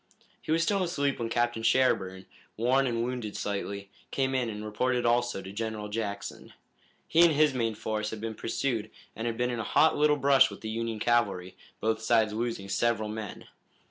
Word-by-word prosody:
He -, -, -5 dB
was 165 Hz, +1 st, +3 dB
still 195 Hz, +2 st, +1 dB
asleep 145 Hz, -6 st, 0 dB
when 115 Hz, -1 st, -2 dB
Captain 120 Hz, -1 st, 0 dB
Sherburne, 110 Hz, -6 st, +2 dB, 0.3 s
worn 130 Hz, +4 st, +3 dB
and 115 Hz, -1 st, 0 dB
wounded 120 Hz, -4 st, -4 dB
slightly, 100 Hz, -1 st, -4 dB, 0.2 s
came 135 Hz, -1 st, 0 dB
in 125 Hz, -3 st, 0 dB
and 105 Hz, 0 st, -6 dB
reported 125 Hz, +3 st, 0 dB
also 120 Hz, -4 st, +1 dB
to 95 Hz, -, -8 dB
General 110 Hz, 0 st, -4 dB
Jackson. 105 Hz, -1 st, -5 dB, 0.5 s
He 165 Hz, -, +4 dB
and 170 Hz, -2 st, +7 dB
his 150 Hz, -1 st, +4 dB
main 115 Hz, -3 st, -1 dB
force 110 Hz, 0 st, -2 dB
had 110 Hz, -, -6 dB
been 110 Hz, +1 st, -4 dB
pursued 115 Hz, 0 st, -2 dB, 0.3 s
and 115 Hz, +2 st, -3 dB
had 115 Hz, -1 st, -2 dB
been 125 Hz, 0 st, 0 dB
in 120 Hz, -, -3 dB
a -, -, -1 dB
hot 160 Hz, +8 st, +4 dB
little 150 Hz, 0 st, +3 dB
brush 140 Hz, -1 st, +5 dB
with -, -, -10 dB
the 110 Hz, -, -5 dB
Union 115 Hz, 0 st, -2 dB
cavalry, 110 Hz, -6 st, +1 dB, 0.2 s
both 110 Hz, +1 st, 0 dB
sides 110 Hz, -1 st, +3 dB
losing 115 Hz, -3 st, -3 dB
several 110 Hz, +2 st, 0 dB
men. 110 Hz, -1 st, -6 dB
115 Hz, 190 wpm, -29 LUFS, 105-130 Hz, 0.5 s, and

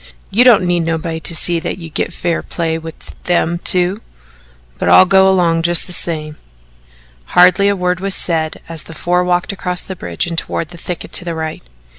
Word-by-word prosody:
"You 230 Hz, +5 st, +4 dB
don't 240 Hz, -7 st, +5 dB
need 175 Hz, 0 st, +1 dB
nobody 165 Hz, 0 st, -3 dB
to 165 Hz, -, 0 dB
see 170 Hz, +1 st, +4 dB
that 165 Hz, -, -5 dB
you 165 Hz, -3 st, -10 dB
git -, -, -2 dB
fair 170 Hz, -1 st, -2 dB
play 165 Hz, -1 st, -3 dB
with 160 Hz, 0 st, -11 dB
them 175 Hz, -1 st, 0 dB
two 180 Hz, +4 st, +3 dB, 0.8 s
but -, -, 0 dB
I'll -, -, +7 dB
go 190 Hz, 0 st, +4 dB
'long 170 Hz, -3 st, +2 dB
just 170 Hz, 0 st, +2 dB
the 180 Hz, -, -5 dB
same." 155 Hz, -3 st, -3 dB, 1.0 s
Hardly 180 Hz, +3 st, +6 dB
a 200 Hz, -, +2 dB
word 180 Hz, -1 st, -1 dB
was 195 Hz, 0 st, -1 dB
said 160 Hz, -2 st, -2 dB
as 165 Hz, -2 st, -6 dB
the 165 Hz, -, -12 dB
four 180 Hz, +3 st, 0 dB
walked 180 Hz, +3 st, 0 dB
across 180 Hz, -2 st, -3 dB
the 190 Hz, -, -7 dB
bridge 85 Hz, -, -3 dB
and 170 Hz, -1 st, -4 dB
toward 170 Hz, +1 st, -5 dB
a -, -, -11 dB
thicket 175 Hz, 0 st, -7 dB
to -, -, 0 dB
the 170 Hz, -1 st, -4 dB
right. 160 Hz, -1 st, -5 dB
175 Hz, 200 wpm, -15 LUFS, 165-180 Hz, 1.0 s, I'll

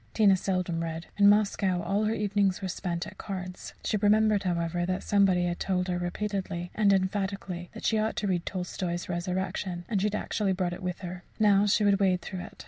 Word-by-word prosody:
Tina 205 Hz, -3 st, +6 dB
seldom 180 Hz, -3 st, -1 dB
read 165 Hz, 0 st, -4 dB
in 200 Hz, 0 st, +7 dB
Moscow, 200 Hz, -3 st, +2 dB
all 200 Hz, +4 st, 0 dB
her 215 Hz, -, +1 dB
evenings 205 Hz, -2 st, +1 dB
were 190 Hz, -, -3 dB
spent 175 Hz, -1 st, -3 dB
at -, -, -11 dB
cards. 185 Hz, -2 st, -6 dB
She 215 Hz, -, 0 dB
remembered, 210 Hz, 0 st, +4 dB
however, 175 Hz, -2 st, -1 dB
that 185 Hz, +1 st, -2 dB
somebody 195 Hz, -3 st, +3 dB
had 175 Hz, 0 st, -2 dB
told 185 Hz, -1 st, 0 dB
her 180 Hz, 0 st, 0 dB
repeatedly, 180 Hz, -1 st, -3 dB
and 210 Hz, -2 st, +3 dB
emphatically, 190 Hz, -2 st, -1 dB
that -, -, -7 dB
she 220 Hz, -, +2 dB
ought 220 Hz, +1 st, 0 dB
to 205 Hz, -, -1 dB
read 180 Hz, -3 st, 0 dB
Tolstoy's 180 Hz, -1 st, -4 dB
"Resurrection," 180 Hz, 0 st, -3 dB
and 205 Hz, -5 st, 0 dB
she 210 Hz, -, +2 dB
had 210 Hz, -, -2 dB
actually 205 Hz, -2 st, 0 dB
brought 180 Hz, -2 st, -1 dB
it 175 Hz, -, -8 dB
with 180 Hz, 0 st, -4 dB
her. 180 Hz, -1 st, -6 dB, 0.2 s
Now 205 Hz, -2 st, +4 dB
she 210 Hz, +1 st, +3 dB
would 200 Hz, -1 st, +4 dB
wade 185 Hz, -2 st, +2 dB
through 185 Hz, -, -5 dB
it. -, -, -9 dB
190 Hz, 210 wpm, -28 LUFS, 180-205 Hz, 0.2 s, in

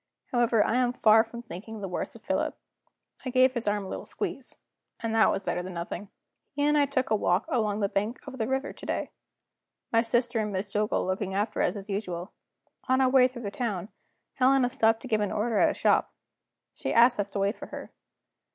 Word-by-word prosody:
However, 235 Hz, -3 st, +3 dB
I 240 Hz, -, +1 dB
am 250 Hz, -1 st, +2 dB
far 220 Hz, -2 st, +5 dB
from 235 Hz, +1 st, -9 dB
thinking 220 Hz, +1 st, -8 dB
the 195 Hz, -, -4 dB
worse 180 Hz, -, -4 dB
of 230 Hz, -, -14 dB
Philip. 300 Hz, +2 st, -1 dB, 0.7 s
I 260 Hz, -, -3 dB
gave 255 Hz, 0 st, +4 dB
his 240 Hz, -4 st, -4 dB
arm 205 Hz, -1 st, 0 dB
a -, -, -7 dB
little -, -, -6 dB
squeeze -, -, -5 dB, 0.4 s
and 230 Hz, -1 st, -2 dB
that 225 Hz, -1 st, +5 dB
was 195 Hz, -, -1 dB
better 180 Hz, -, -1 dB
than 180 Hz, 0 st, -7 dB
nothing........ 175 Hz, +4 st, -5 dB, 0.4 s
He 285 Hz, 0 st, -1 dB
and 295 Hz, +1 st, +3 dB
I 290 Hz, -1 st, +4 dB
took 260 Hz, -4 st, -1 dB
a -, -, +5 dB
walk 185 Hz, -1 st, +1 dB
along 215 Hz, -4 st, 0 dB
the 200 Hz, -, +2 dB
bank 210 Hz, +5 st, -2 dB
of 265 Hz, -2 st, -8 dB
the 220 Hz, -, 0 dB
river 265 Hz, +2 st, -2 dB
to -, -, -11 dB
day; -, -, -2 dB, 0.8 s
my 230 Hz, -, +5 dB
sister 240 Hz, 0 st, 0 dB
and 210 Hz, -1 st, -1 dB
Miss 195 Hz, +1 st, -3 dB
Jillgall 210 Hz, 0 st, +1 dB
looking 190 Hz, +1 st, -2 dB
after 210 Hz, +2 st, 0 dB
us 180 Hz, -, +1 dB
as 200 Hz, 0 st, -7 dB
usual. 190 Hz, -3 st, -4 dB, 0.6 s
On 260 Hz, 0 st, +4 dB
our 260 Hz, -1 st, +4 dB
way 255 Hz, -1 st, +6 dB
through 245 Hz, -2 st, -9 dB
the 200 Hz, -, -3 dB
town, 205 Hz, -5 st, -3 dB, 0.4 s
Helena 260 Hz, -1 st, +3 dB
stopped 225 Hz, -2 st, +2 dB
to -, -, -6 dB
give 215 Hz, -3 st, +1 dB
an 205 Hz, -, -1 dB
order 215 Hz, 0 st, 0 dB
at -, -, +5 dB
a -, -, -1 dB
shop. -, -, +2 dB, 0.6 s
She -, -, -4 dB
asked 235 Hz, 0 st, +5 dB
us 200 Hz, 0 st, 0 dB
to 200 Hz, -, -4 dB
wait 200 Hz, +3 st, +1 dB
for -, -, -9 dB
her. -, -, -8 dB
225 Hz, 225 wpm, -28 LUFS, 200-250 Hz, 0.8 s, way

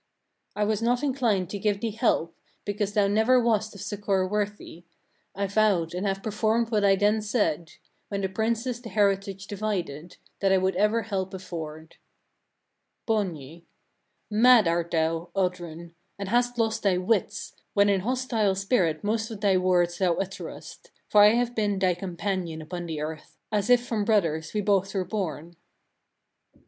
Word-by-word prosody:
"I 210 Hz, -, 0 dB
was 215 Hz, 0 st, 0 dB
not 245 Hz, +3 st, +1 dB
inclined 235 Hz, -10 st, 0 dB
to 205 Hz, -, -4 dB
give 205 Hz, 0 st, 0 dB
thee 230 Hz, 0 st, -2 dB
help, 200 Hz, -7 st, 0 dB, 0.3 s
because 205 Hz, 0 st, -2 dB
thou 205 Hz, -2 st, +3 dB
never 220 Hz, +5 st, +4 dB
wast 220 Hz, -3 st, 0 dB
of 200 Hz, -, -9 dB
succour 200 Hz, -2 st, -1 dB
worthy: 205 Hz, -4 st, -4 dB, 0.5 s
I 200 Hz, +1 st, -1 dB
vowed, 195 Hz, -5 st, +1 dB
and 185 Hz, +3 st, -2 dB
have 195 Hz, 0 st, -2 dB
performed 220 Hz, +2 st, 0 dB
what 210 Hz, -2 st, +2 dB
I 195 Hz, -1 st, +5 dB
then 210 Hz, +2 st, +2 dB
said 175 Hz, -7 st, -1 dB, 0.3 s
when 200 Hz, -2 st, -3 dB
the 190 Hz, -, 0 dB
princes 230 Hz, +5 st, -2 dB
the 230 Hz, -, -8 dB
heritage 195 Hz, -2 st, 0 dB
divided, 180 Hz, -7 st, -4 dB, 0.2 s
that 195 Hz, -1 st, +2 dB
I 190 Hz, -, +5 dB
would 190 Hz, 0 st, 0 dB
ever 210 Hz, +4 st, +2 dB
help 190 Hz, -3 st, -3 dB
afford." 160 Hz, -4 st, -8 dB, 1.1 s
Borgny. 170 Hz, -, -2 dB, 0.6 s
12. 215 Hz, +1 st, -1 dB
Mad 245 Hz, -5 st, +7 dB
art 170 Hz, 0 st, 0 dB
thou, 165 Hz, +1 st, 0 dB
Oddrun! 175 Hz, -3 st, -3 dB, 0.2 s
and 200 Hz, -1 st, -5 dB
hast 245 Hz, +2 st, +1 dB
lost 225 Hz, -1 st, 0 dB
thy 195 Hz, -3 st, +2 dB
wits, 200 Hz, +1 st, -1 dB, 0.2 s
when 200 Hz, 0 st, +5 dB
in 200 Hz, -1 st, +3 dB
hostile 230 Hz, -2 st, 0 dB
spirit 190 Hz, -5 st, 0 dB
most 220 Hz, +1 st, -1 dB
of 220 Hz, -3 st, -7 dB
thy 200 Hz, -3 st, +3 dB
words 180 Hz, -1 st, +2 dB
thou 180 Hz, -3 st, +2 dB
utterest; 195 Hz, 0 st, -7 dB, 0.2 s
for 210 Hz, -, +6 dB
I 210 Hz, +2 st, +7 dB
have 240 Hz, 0 st, 0 dB
been 210 Hz, -3 st, 0 dB
thy 185 Hz, -1 st, +2 dB
companion 175 Hz, -2 st, -3 dB
upon 175 Hz, +2 st, -6 dB
the 155 Hz, -2 st, -4 dB
earth, 155 Hz, 0 st, -7 dB
as 210 Hz, +1 st, 0 dB
if 245 Hz, 0 st, +5 dB
from 220 Hz, -4 st, -1 dB
brothers 165 Hz, -8 st, +1 dB
we 210 Hz, -, +1 dB
both 195 Hz, -1 st, +1 dB
were 190 Hz, -1 st, 0 dB
born. 170 Hz, -4 st, -4 dB
200 Hz, 165 wpm, -26 LUFS, 180-215 Hz, 1.1 s, Mad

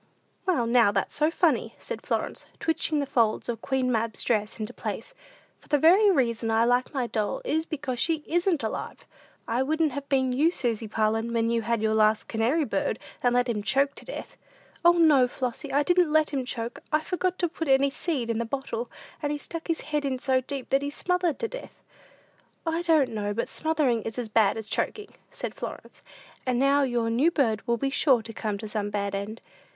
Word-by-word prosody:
"Well, 280 Hz, -11 st, +2 dB
now, 235 Hz, -3 st, +4 dB
that's 195 Hz, -1 st, -1 dB
so 305 Hz, +1 st, +3 dB
funny!" 330 Hz, -, +1 dB
said -, -, -6 dB
Florence, -, -, -3 dB
twitching 320 Hz, -1 st, 0 dB
the 285 Hz, -, 0 dB
folds 230 Hz, -5 st, +1 dB
of 230 Hz, -2 st, -3 dB
Queen 260 Hz, -2 st, 0 dB
Mab's 225 Hz, -2 st, -1 dB
dress 215 Hz, -1 st, 0 dB
into 215 Hz, +3 st, -4 dB
place; -, -, -5 dB, 0.5 s
"for -, -, -22 dB
the 295 Hz, -, +3 dB
very 370 Hz, +8 st, +6 dB
reason 235 Hz, -, +1 dB
I 225 Hz, +1 st, +3 dB
like 245 Hz, +1 st, +2 dB
my 265 Hz, -4 st, -1 dB
doll, 215 Hz, -3 st, -2 dB
is 320 Hz, +2 st, 0 dB
because 280 Hz, -6 st, -4 dB
she 320 Hz, 0 st, +1 dB
isn't 345 Hz, -4 st, +1 dB
alive. 220 Hz, -, -5 dB, 0.4 s
I 235 Hz, +3 st, +1 dB
wouldn't 310 Hz, +2 st, +1 dB
have 280 Hz, +2 st, -6 dB
been 260 Hz, -2 st, +2 dB
you, 295 Hz, +6 st, +4 dB
Susy 235 Hz, -9 st, -2 dB
Parlin, 220 Hz, +2 st, 0 dB
when 230 Hz, 0 st, +1 dB
you 230 Hz, 0 st, +1 dB
had 230 Hz, 0 st, -1 dB
your 220 Hz, 0 st, +2 dB
last 215 Hz, 0 st, +3 dB
canary 245 Hz, +8 st, +1 dB
bird, -, -, -1 dB, 0.2 s
and 245 Hz, -1 st, +2 dB
let 245 Hz, +1 st, +3 dB
him 225 Hz, -3 st, -1 dB
choke 275 Hz, +6 st, +2 dB
to -, -, -12 dB
death." -, -, -8 dB, 0.5 s
"O, 345 Hz, 0 st, +7 dB
no, 305 Hz, -7 st, +5 dB
Flossy, 255 Hz, +3 st, -4 dB
I 285 Hz, +2 st, +3 dB
didn't 355 Hz, -1 st, +3 dB
let 310 Hz, 0 st, +3 dB
him 270 Hz, -3 st, -2 dB
choke: 235 Hz, -1 st, -4 dB
I 305 Hz, 0 st, +3 dB
forgot 365 Hz, +2 st, -1 dB
to 350 Hz, -, +1 dB
put 325 Hz, -1 st, -5 dB
any 275 Hz, +1 st, +4 dB
seed 275 Hz, -6 st, -2 dB
in 225 Hz, -, -1 dB
the -, -, 0 dB
bottle, 235 Hz, -1 st, -4 dB, 0.3 s
and 290 Hz, -1 st, -1 dB
he 295 Hz, -, -1 dB
stuck 325 Hz, +3 st, -7 dB
his 330 Hz, -2 st, -1 dB
head 300 Hz, -1 st, -2 dB
in 270 Hz, -2 st, -1 dB
so 260 Hz, 0 st, +1 dB
deep, 265 Hz, 0 st, -6 dB
that 270 Hz, -, +3 dB
he 285 Hz, -, -2 dB
smothered 355 Hz, +1 st, 0 dB
to 460 Hz, -, -2 dB
death." -, -, -9 dB, 0.9 s
"I 325 Hz, +1 st, 0 dB
don't 320 Hz, -6 st, +3 dB
know 205 Hz, -2 st, -3 dB
but 230 Hz, -, -1 dB
smothering 300 Hz, -7 st, +1 dB
is 225 Hz, +2 st, -5 dB
as 240 Hz, -3 st, -3 dB
bad 215 Hz, -1 st, +3 dB
as 220 Hz, -1 st, -6 dB
choking," 420 Hz, -, -2 dB, 0.2 s
said -, -, -5 dB
Florence; -, -, -8 dB, 0.4 s
"and 250 Hz, -2 st, 0 dB
now 275 Hz, +2 st, +4 dB
your 240 Hz, -4 st, 0 dB
new 265 Hz, +8 st, +4 dB
bird 230 Hz, -10 st, +1 dB
will 235 Hz, 0 st, +2 dB
be 270 Hz, +4 st, -1 dB
sure 265 Hz, -5 st, +3 dB
to 225 Hz, 0 st, -8 dB
come 210 Hz, -1 st, -3 dB
to 215 Hz, +2 st, -7 dB
some 210 Hz, -1 st, -2 dB
bad 200 Hz, -1 st, -2 dB
end." 205 Hz, +3 st, -4 dB
260 Hz, 210 wpm, -27 LUFS, 230-305 Hz, 0.9 s, O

